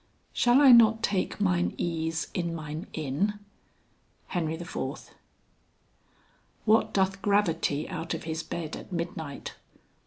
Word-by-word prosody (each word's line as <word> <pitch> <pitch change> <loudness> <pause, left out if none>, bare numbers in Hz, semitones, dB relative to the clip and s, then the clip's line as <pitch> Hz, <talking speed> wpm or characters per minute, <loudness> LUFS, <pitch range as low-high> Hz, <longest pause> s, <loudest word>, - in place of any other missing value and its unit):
"Shall 245 +1 +4
I 275 -3 +8
not 225 -1 +6
take 195 -2 0
mine 180 -3 +1
ease 165 -1 -2
in 170 -2 -2
mine 155 +3 -6
inn?" 160 +8 -1 0.9
HEN. 170 -4 -1
IV. 165 +2 -5 1.5
"What 220 0 +4
doth 195 0 +1
gravity 170 -7 +1
out 170 -2 -4
of 165 - -7
his 160 0 -3
bed 165 -2 -5
at - - -11
midnight?" 165 -4 -5
175 Hz, 120 wpm, -28 LUFS, 160-200 Hz, 1.5 s, I